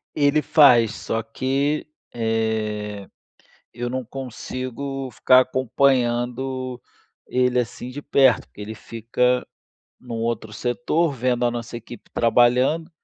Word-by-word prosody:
Ele 145 +1 +3
faz. 125 -9 +5
Só 115 0 -3
que, 135 +6 -1 0.3
eh, 110 -3 -2 0.7
eu 120 +1 -4
não 130 0 -3
consigo 130 +1 -5
ficar 130 +3 +5
acompanhando 130 0 0 0.5
ele 125 0 +2
assim 120 +1 -6
de 145 +3 -7
perto, 135 -5 +3
porque - - -16
ele 105 +2 -6
fica 115 +3 -1 0.5
num 120 -2 -6
outro 115 -1 -3
setor, 150 +8 0
vendo 125 -1 0
a 120 - +3
nossa 120 -1 -5
equipe 120 0 -11
trabalhando. 125 +8 +3
125 Hz, 115 wpm, -23 LUFS, 115-130 Hz, 0.7 s, faz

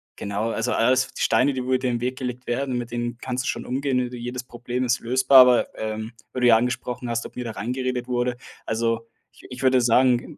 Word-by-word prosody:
genau, 100 +3 -3
also, 115 +2 -1
alles 130 +2 +2
die - - -7
Steine, 140 +2 +3
die 130 -1 -3
wo 125 - -6
dir - - +4
den 125 -2 -1
Weg 130 +1 -2
gelegt 125 -1 -5
werden, 130 +1 -1
mit 120 -1 -4
denen 120 0 -3
kannst 125 0 -3
du - - -4
schon - - -2
umgehen, 135 +1 -1
ne 125 - +1
jedes 125 +1 -5
Problem 125 +1 -4
ist 125 -1 +1
lösbar, 130 +3 +4
aber, 125 -1 +6
ähm, 110 +1 -4 0.2
weil 130 - -3
du 125 - +5
ja 115 -2 +7
angesprochen 125 +1 -3
hast, 120 0 -2
ob - - -21
mir 125 - -5
da 115 - -4
reingeredet 125 +2 -3
wurde. 125 0 -1 0.3
Also, 115 0 -1 0.2
ich - - -20
ich 125 - -7
würde 130 -1 +4
sagen, 120 +1 +2
125 Hz, 230 wpm, -24 LUFS, 120-130 Hz, 0.3 s, ja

